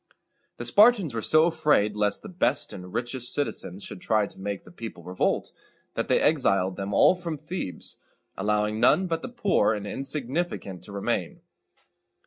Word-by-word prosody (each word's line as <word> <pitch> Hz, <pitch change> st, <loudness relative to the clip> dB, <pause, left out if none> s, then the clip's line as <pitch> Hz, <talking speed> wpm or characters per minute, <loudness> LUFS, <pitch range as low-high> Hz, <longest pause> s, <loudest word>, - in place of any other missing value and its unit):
The -, -, -5 dB
Spartans 205 Hz, -, +5 dB
were 115 Hz, -, -2 dB
so 155 Hz, +7 st, +4 dB
afraid 150 Hz, -11 st, +2 dB
lest 105 Hz, -1 st, 0 dB
the -, -, -7 dB
best 160 Hz, -, 0 dB
and 90 Hz, -1 st, -9 dB
richest 120 Hz, +2 st, -1 dB
citizens 100 Hz, -9 st, -2 dB
should 90 Hz, -, -8 dB
try 110 Hz, -1 st, +2 dB
to -, -, -12 dB
make 100 Hz, 0 st, -4 dB
the -, -, -15 dB
people 110 Hz, -3 st, -8 dB
revolt, 90 Hz, +2 st, -1 dB, 0.4 s
that -, -, -2 dB
they -, -, +3 dB
exiled 100 Hz, -, +2 dB
them 100 Hz, 0 st, -4 dB
all 100 Hz, -, +6 dB
from 175 Hz, -4 st, -5 dB
Thebes, 150 Hz, -, -5 dB, 0.4 s
allowing 105 Hz, +2 st, 0 dB
none 190 Hz, -, +4 dB
but 165 Hz, -2 st, -2 dB
the -, -, -6 dB
poor 200 Hz, -, +2 dB
and 105 Hz, -1 st, -5 dB
insignificant 135 Hz, -, -3 dB
to -, -, -11 dB
remain. 100 Hz, 0 st, -2 dB
115 Hz, 165 wpm, -26 LUFS, 100-160 Hz, 0.4 s, all